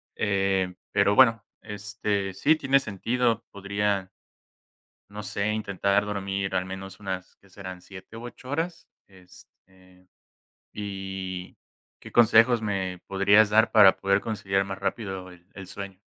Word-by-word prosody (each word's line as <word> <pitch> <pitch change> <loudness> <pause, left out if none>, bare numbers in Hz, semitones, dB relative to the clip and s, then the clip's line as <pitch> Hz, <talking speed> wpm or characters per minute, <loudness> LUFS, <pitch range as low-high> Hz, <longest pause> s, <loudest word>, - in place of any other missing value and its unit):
eh, 95 -2 0 0.2
pero 100 0 +3
bueno, 115 -3 +5 0.2
este, 100 -1 -3
sí 145 +12 +3
tiene 135 -2 +3
sentido, 115 +1 -1
podría, 100 -1 -2 1.0
no 105 +1 -8
sé, 100 0 -2
intentar 100 -1 0
dormir 100 -1 -3
al 90 - +1
menos 95 0 -8
unas, 95 -2 -6
¿qué 95 - -24
serán 95 -2 -9
7 95 +4 -12
u 115 - -9
8 120 +1 -10
horas?, 165 +3 -3 0.2
este, 95 0 -21 0.7
y, 95 -2 -6 0.4
¿qué - - -11
consejos 120 +1 +5
me 95 -3 -2
podrías 100 +2 +4
dar 110 +2 +4
para 105 -3 +7
poder 100 0 +1
conciliar 100 -3 -1
más 95 0 -6
rápido 95 -4 -4
el 90 -1 -17
el 95 -1 -9
sueño? 95 -1 -8
100 Hz, 135 wpm, -26 LUFS, 95-105 Hz, 1.0 s, para